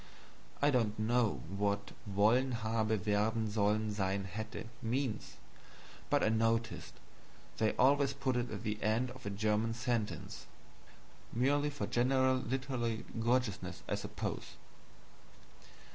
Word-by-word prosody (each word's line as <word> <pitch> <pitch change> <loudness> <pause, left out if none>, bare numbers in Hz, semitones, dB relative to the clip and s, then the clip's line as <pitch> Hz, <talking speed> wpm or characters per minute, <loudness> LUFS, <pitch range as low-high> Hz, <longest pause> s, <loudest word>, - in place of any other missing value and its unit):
(I 145 - +5
don't 115 -5 +1
know 110 - +1
what 100 +1 -1 0.2
wollen 110 +6 +3
haben 110 -2 +1
werden 110 +2 +1
sollen 105 +1 +2
sein 95 -1 -1
hätte 110 +2 -5 0.2
means, 120 +1 -2 0.7
but - - +3
I - - +4
notice 115 0 0 0.7
they 110 -1 +3
always 140 +1 +4
put 135 -2 -1
it 120 0 0
at 105 -2 -5
the 105 0 -2
end 115 +4 +1
of 130 -4 -9
a - - 0
German 110 +2 +1
sentence 115 - -2 0.8
merely 145 +5 +2
for 145 -8 -3
general 130 +3 +3
literary 125 -3 -2
gorgeousness, 120 -2 0
I - - -1
suppose.) - - -4
115 Hz, 120 wpm, -34 LUFS, 105-125 Hz, 0.8 s, I